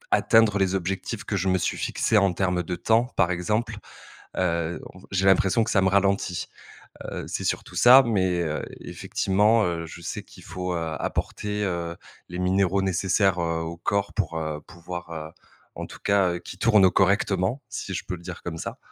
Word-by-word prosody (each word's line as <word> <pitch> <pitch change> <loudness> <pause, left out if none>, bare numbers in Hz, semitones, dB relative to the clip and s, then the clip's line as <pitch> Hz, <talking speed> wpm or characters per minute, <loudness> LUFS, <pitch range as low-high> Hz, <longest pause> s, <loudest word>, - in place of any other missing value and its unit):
atteindre 110 -3 +4
les 95 0 +1
objectifs 95 +4 -3
que 105 - -3
je 95 0 0
me 95 - +3
suis 90 - -1
fixés. 110 - +1
En 100 -2 +2
termes 90 -1 0
de 90 +1 -4
temps, 115 +5 +2
par 85 +2 +2
exemple, 105 +5 -1 0.6
heu, 85 -2 -1
en 95 - -14
f - - -19
j'ai 95 0 +1
l'impression 95 +3 +4
que - - -3
ça 95 - +3
me 95 - +3
ralentit. 100 -2 +1 0.6
Heu, - - -5
c'est - - -4
surtout - - -3
ça, 125 +2 +8
mais, 95 -6 +1
heu, 75 -2 -2 0.2
effectivement, 105 +4 +1
heu, 85 -1 -2
je 80 +1 -10
sais 85 - -5
qu'il - - -16
faut, 90 0 -4
heu, 80 -2 -3
apporter, 105 0 -3
heu, 85 -3 -2 0.3
les 90 +1 -6
minéraux 95 +1 +2
nécessaires, 95 0 +1
heu, 85 -1 -1
au 80 +1 -5
corps, 100 +4 -1
pour, 85 -6 -2
heu, 80 -1 -4
pouvoir, 85 0 -8
heu, 80 -1 -6 0.5
en - - -5
tout - - -12
cas, 100 -3 +3
heu, 85 - -4
qu'il 90 - -10
tourne 105 -3 +5
correctement, 95 +5 +1
si 95 - -5
je 90 - -3
peux 90 - -4
le 85 - -14
dire 90 -1 -7
comme 80 -2 -5
ça. - - -6
95 Hz, 195 wpm, -25 LUFS, 85-100 Hz, 0.6 s, ça